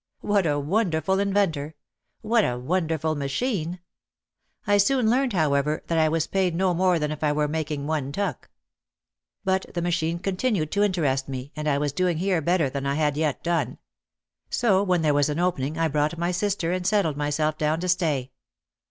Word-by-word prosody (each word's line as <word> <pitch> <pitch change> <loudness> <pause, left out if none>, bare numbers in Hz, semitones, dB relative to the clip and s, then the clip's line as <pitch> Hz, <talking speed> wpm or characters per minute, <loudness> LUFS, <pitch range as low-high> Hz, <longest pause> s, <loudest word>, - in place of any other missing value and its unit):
"What 200 -4 +1
a 145 -1 +1
wonderful 175 +2 0
inventor! 190 -7 0 0.5
What 230 0 +2
a 125 -7 -1
wonderful 160 +2 -1
ma 140 -2 -3
chine 175 - -1
l" 180 - -11 0.9
I - - +6
soon 245 +3 +3
learned, 255 -1 +1
however, 150 -3 +1
that 165 -1 0
I 155 -1 +4
was 160 0 0
paid 185 -3 0
no 185 +1 +2
more 180 0 +2
than 150 -1 -1
if 155 0 -5
I 150 - +3
were 150 0 +1
making 150 -2 -3
one 145 -3 -2
tuck! 180 -3 -3 0.9
But 190 0 0
the 175 - 0
machine 170 -1 0
continued 185 - -1
to 205 - +1
interest 150 -10 +1
me, 130 +1 -6
and 155 0 -4
I 140 -2 +2
was 145 -1 -1
doing 180 +1 +1
here 180 -1 +1
better 170 -1 +2
than 140 +1 -4
I 140 - 0
had 150 -2 +1
yet 150 -2 -1
done. 170 -1 -1 0.7
So 200 -6 +2
when 180 -4 +1
there 150 -2 +3
was 145 0 +2
an 150 - -2
opening 160 -4 -1
I 165 0 +2
brought 150 +2 0
my 170 +1 0
sister 180 -2 -1
and 180 0 -1
settled 195 -8 +2
myself 150 +1 0
down 155 +1 +1
to 180 - -2
stay. 155 -8 0
160 Hz, 195 wpm, -25 LUFS, 150-185 Hz, 0.9 s, I